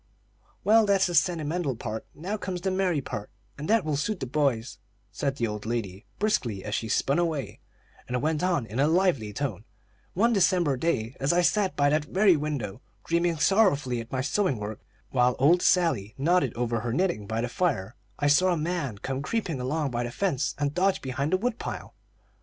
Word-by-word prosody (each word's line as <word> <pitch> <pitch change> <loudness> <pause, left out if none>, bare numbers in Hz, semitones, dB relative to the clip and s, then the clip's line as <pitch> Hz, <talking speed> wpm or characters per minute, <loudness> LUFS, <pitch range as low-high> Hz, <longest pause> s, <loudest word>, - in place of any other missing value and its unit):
"Well, 220 0 +5
that's 195 -1 +4
the 175 - -2
sentimental 165 -4 +1
part; 110 -1 -5
now 185 +7 -4
comes 180 -3 -4
the 190 - 0
merry 185 -5 +1
part, 105 -5 -6 0.3
and 150 +2 -6
that 220 -4 +3
will 155 -2 0
suit 180 +8 -1
the - - -3
boys," 125 -5 -1 0.3
said 140 -1 -2
the 120 - -1
old 105 -1 -4
lady, 105 -4 -4
briskly, 120 - -1
as 105 - -4
she 110 -1 -2
spun 140 +7 +1
away, 160 -6 -2 0.5
and 125 0 -1
went 155 +2 0
on 175 -9 +1
in 110 +4 -5
a 145 - +4
lively 160 - +2
tone: 110 -3 -3 0.5
"One 230 +6 +3
December 180 -7 +3
day, 130 -5 -1
as 135 +2 +2
I 175 +1 +3
sat 195 +2 +2
by 145 0 +3
that 150 0 +1
very 190 +2 +4
window, 140 -8 -3 0.2
dreaming 170 0 +1
sorrowfully 145 - +2
at 115 - -12
my 130 - -1
sewing 145 - 0
work, 105 0 -5 0.3
while 125 -1 +3
old 165 +7 +4
Sally 140 - +2
nodded 145 -2 +2
over 120 -1 -1
her 120 +1 -3
knitting 170 - 0
by 110 +1 -1
the 120 - -1
fire, 120 - -1 0.2
I 145 - -1
saw 180 +6 +4
a 175 - +1
man 155 - -2
come 135 +5 -4
creeping 165 - -2
along 145 +2 -1
by 120 0 -1
the 120 - -3
fence 150 -1 -1
and 145 -1 -1
dodge 190 +3 +1
behind 135 +3 -2
the 185 - +4
wood 235 +3 -2
pile. - - -6
145 Hz, 200 wpm, -27 LUFS, 120-180 Hz, 0.5 s, Well